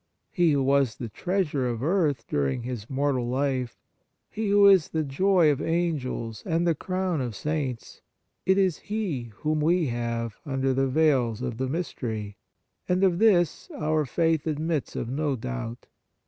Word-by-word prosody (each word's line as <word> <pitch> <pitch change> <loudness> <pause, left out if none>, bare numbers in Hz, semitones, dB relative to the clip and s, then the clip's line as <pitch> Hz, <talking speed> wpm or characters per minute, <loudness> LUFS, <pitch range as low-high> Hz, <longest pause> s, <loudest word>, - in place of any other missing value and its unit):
He 175 -4 +3
who 140 -1 +2
was 135 -3 +2
the 120 - -6
treasure 165 - -1
of 120 0 -3
earth 150 -8 +1
during 70 - -1
His 120 -3 -6
mortal 135 -3 0
life, 130 -2 -1 0.5
He 215 -1 -2
who 200 0 +6
is 190 -5 +6
the 160 -1 -1
joy 170 +3 +3
of 140 - -2
Angels 145 -10 -2
and 165 +1 0
the 170 - +3
crown 185 0 -2
of 120 -4 -4
Saints, 140 -3 -4 0.4
it 190 +1 +3
is 190 -5 +2
He 195 - -2 0.2
whom 155 0 0
we 170 +2 +3
have 115 -2 -3
under 135 -2 0
the 135 +1 +1
veils 130 -5 +2
of 120 -3 -3
the 130 0 -1
mystery, 110 - -4 0.5
and 180 +1 +2
of 180 -2 +3
this 185 -7 +3
our 155 -1 0
faith 160 +2 +1
admits 155 -1 -2
of - - -3
no 140 +2 -1
doubt. 110 - -5
145 Hz, 160 wpm, -26 LUFS, 125-170 Hz, 0.5 s, who